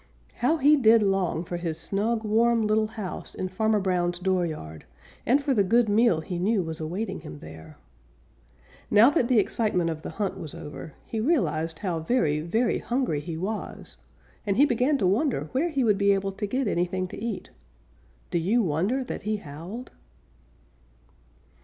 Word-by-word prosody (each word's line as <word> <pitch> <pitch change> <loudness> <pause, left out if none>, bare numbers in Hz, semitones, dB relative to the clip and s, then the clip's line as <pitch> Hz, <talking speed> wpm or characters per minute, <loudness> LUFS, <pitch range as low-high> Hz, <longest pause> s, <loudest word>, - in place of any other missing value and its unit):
How 310 +7 +2
he 295 +1 +5
did 225 -4 +5
long 190 -4 0
for 175 0 -5
his 165 -2 -3
snug, 215 +6 -1
warm, 225 +1 +2
little 215 0 +2
house 215 -4 -7
in 185 - -3
Farmer 215 +3 +1
Brown's 175 -2 0
dooryard, 170 - -2 0.4
and 275 +4 +3
for 280 - +1
the 205 -5 +3
good 230 +4 +3
meal 205 -6 +3
he 175 +2 -5
knew 200 +1 +1
was 160 -1 -6
awaiting 175 +8 -3
him 75 - -9
there. 80 +1 -12 1.1
Now 220 +6 +6
that 270 -7 +1
the 250 -2 +3
excitement 200 -5 +1
of 155 -1 -6
the - - -6
hunt 200 -2 -3
was 155 - -6
over, 150 0 -8
he 225 - -4
realized 165 - 0
how 180 -4 -2
very, 160 -5 +1
very 220 +10 0
hungry 245 - -1
he 160 +2 -6
was, 205 +5 -5 0.5
and 200 -3 -1
he 285 - +7
began 260 +2 +2
to 210 - 0
wonder 230 +10 +1
where 285 +7 +1
he 280 -5 0
would 210 -3 +2
be 200 0 +4
able 195 0 -1
to 205 +2 -4
get 255 +3 -1
anything 185 0 -1
to 205 - -8
eat. 230 -5 -4 0.8
Do 170 - +1
you 215 +8 +2
wonder 190 - 0
that 250 - -6
he 215 +1 -1
howled? 180 - -8
200 Hz, 175 wpm, -26 LUFS, 170-235 Hz, 1.1 s, he